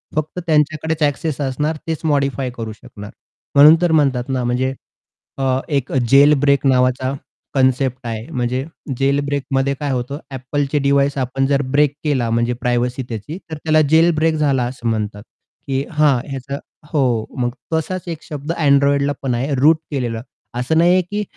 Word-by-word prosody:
फक्त 155 Hz, +3 st, -2 dB
त्यांच्याकडेच 155 Hz, +1 st, +1 dB
एक्सेस 145 Hz, +1 st, -1 dB
असणार. 150 Hz, +3 st, -1 dB
तेच 160 Hz, -1 st, -2 dB
मॉडिफाय 140 Hz, -3 st, 0 dB
करू 110 Hz, -1 st, -4 dB
शकणार. 105 Hz, 0 st, -11 dB, 0.4 s
म्हणून 150 Hz, +3 st, +9 dB
तर 175 Hz, -, +2 dB
म्हणतात 135 Hz, -5 st, +2 dB
ना, 130 Hz, -2 st, -1 dB
म्हणजे, 125 Hz, +2 st, 0 dB, 0.6 s
अ, 130 Hz, -1 st, +1 dB
एक 140 Hz, -3 st, -1 dB, 0.2 s
जेल 140 Hz, +2 st, +7 dB
ब्रेक 140 Hz, 0 st, +2 dB
नावाचा 130 Hz, +1 st, +2 dB, 0.4 s
कन्सेप्ट 130 Hz, -1 st, +1 dB
आहे. 110 Hz, -1 st, -4 dB
म्हणजे 125 Hz, +1 st, -2 dB, 0.3 s
जेल 140 Hz, +2 st, +2 dB
ब्रेकमध्ये 140 Hz, -1 st, -1 dB
काय 145 Hz, -2 st, -2 dB
होतं, 130 Hz, +2 st, -3 dB, 0.2 s
Appleचे 140 Hz, +3 st, -1 dB
डिव्हाइस 140 Hz, 0 st, +2 dB
आपण 135 Hz, +1 st, 0 dB
जर 140 Hz, 0 st, +2 dB
ब्रेक 145 Hz, -1 st, +4 dB
केला, 135 Hz, -6 st, 0 dB
म्हणजे 120 Hz, +1 st, +1 dB
प्रायव्हसी 125 Hz, +1 st, 0 dB
त्याची, 115 Hz, -, -6 dB
तर 160 Hz, -, -4 dB
त्याला 155 Hz, +1 st, +2 dB
जेल 165 Hz, +2 st, +6 dB
ब्रेक 160 Hz, +1 st, +2 dB
झाला 140 Hz, -4 st, +1 dB
असं 120 Hz, -1 st, -5 dB
म्हणतात. 105 Hz, -2 st, -3 dB, 0.4 s
की 135 Hz, 0 st, 0 dB
हा 150 Hz, -3 st, +3 dB
ह्याचा 135 Hz, +1 st, -5 dB, 0.3 s
हो. 125 Hz, -7 st, +1 dB
मग 120 Hz, -1 st, +1 dB, 0.2 s
तसाच 180 Hz, +3 st, -2 dB
एक 165 Hz, -2 st, -6 dB
शब्द 150 Hz, +1 st, -5 dB
Androidला 140 Hz, 0 st, +3 dB
पण 130 Hz, -3 st, -1 dB
आहे, 135 Hz, +5 st, -1 dB
रूट 150 Hz, +5 st, +5 dB
केलेला. 120 Hz, -5 st, -2 dB, 0.4 s
असं 130 Hz, +6 st, 0 dB
नाहीये 175 Hz, +3 st, +5 dB
की 210 Hz, 0 st, -1 dB
140 Hz, 160 wpm, -19 LUFS, 125-150 Hz, 0.6 s, म्हणून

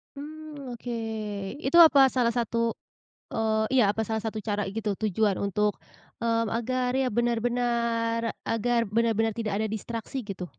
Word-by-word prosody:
Mmm 295 Hz, -2 st, -8 dB
oke. 240 Hz, +1 st, -6 dB, 0.7 s
Itu 280 Hz, +6 st, +3 dB
apa 275 Hz, -3 st, +6 dB
salah 240 Hz, -2 st, +3 dB
satu, 230 Hz, -1 st, 0 dB, 0.6 s
eee, 220 Hz, -1 st, +1 dB
iya 255 Hz, -, +5 dB
apa 220 Hz, -, -2 dB
salah 220 Hz, +1 st, -2 dB
satu 220 Hz, 0 st, -3 dB
cara 205 Hz, -1 st, 0 dB
gitu 210 Hz, 0 st, -2 dB
tujuan 210 Hz, 0 st, 0 dB
untuk, 210 Hz, +1 st, +1 dB, 0.5 s
mmm, 230 Hz, 0 st, +1 dB
agar 250 Hz, +2 st, -1 dB
ya 260 Hz, -, +1 dB
benar-benar 235 Hz, -1 st, +1 dB, 0.2 s
agar 235 Hz, +2 st, +1 dB, 0.2 s
benar-benar 225 Hz, -1 st, +2 dB
tidak 215 Hz, -2 st, -3 dB
ada 220 Hz, -, 0 dB
distraksi 230 Hz, +4 st, -4 dB
gitu? 195 Hz, -5 st, -6 dB
230 Hz, 140 wpm, -27 LUFS, 220-245 Hz, 0.7 s, apa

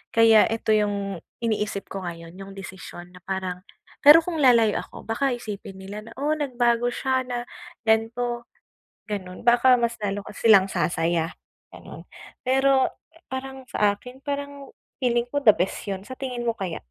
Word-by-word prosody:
kaya 225 Hz, -1 st, +7 dB
eto 225 Hz, 0 st, -1 dB
yung 200 Hz, -3 st, 0 dB, 0.2 s
iniisip 210 Hz, -3 st, -1 dB
ko 195 Hz, -1 st, -5 dB
ngayon 165 Hz, -1 st, -8 dB
yung 195 Hz, 0 st, -9 dB
desisyon 185 Hz, -2 st, -9 dB
na -, -, -12 dB
parang 185 Hz, -1 st, -3 dB, 0.4 s
pero 310 Hz, +3 st, +9 dB
kung 335 Hz, -2 st, -3 dB
lalayo 230 Hz, -5 st, +5 dB
ako -, -, -10 dB
baka 270 Hz, +5 st, 0 dB
isipin 205 Hz, -4 st, -8 dB
nila 210 Hz, +3 st, -8 dB
na, 230 Hz, -, -11 dB
o 290 Hz, +2 st, 0 dB
nagbago 245 Hz, -5 st, +1 dB
siya 260 Hz, +1 st, 0 dB
na 245 Hz, -1 st, -3 dB, 0.4 s
gan'to 235 Hz, +2 st, 0 dB, 0.6 s
gan'on, 185 Hz, -2 st, -6 dB
baka 245 Hz, +2 st, +6 dB
mas 235 Hz, 0 st, 0 dB
lalo 205 Hz, -1 st, -3 dB
pa -, -, -9 dB
silang 220 Hz, -4 st, +6 dB
sasaya 165 Hz, -2 st, 0 dB, 0.4 s
ganon -, -, -12 dB, 0.4 s
pero 265 Hz, +1 st, +3 dB, 0.4 s
parang 265 Hz, 0 st, -6 dB
sakin 210 Hz, +5 st, -1 dB
parang 285 Hz, -1 st, -5 dB, 0.3 s
feeling 240 Hz, -2 st, +1 dB
ko 285 Hz, +3 st, -1 dB
the 215 Hz, -, +9 dB
best 185 Hz, -1 st, -2 dB
yun, 195 Hz, -1 st, -3 dB
sa 260 Hz, +4 st, -9 dB
tingin 245 Hz, -3 st, -4 dB
mo 230 Hz, -, 0 dB
kaya? 185 Hz, -5 st, -4 dB
230 Hz, 155 wpm, -24 LUFS, 195-255 Hz, 0.6 s, pero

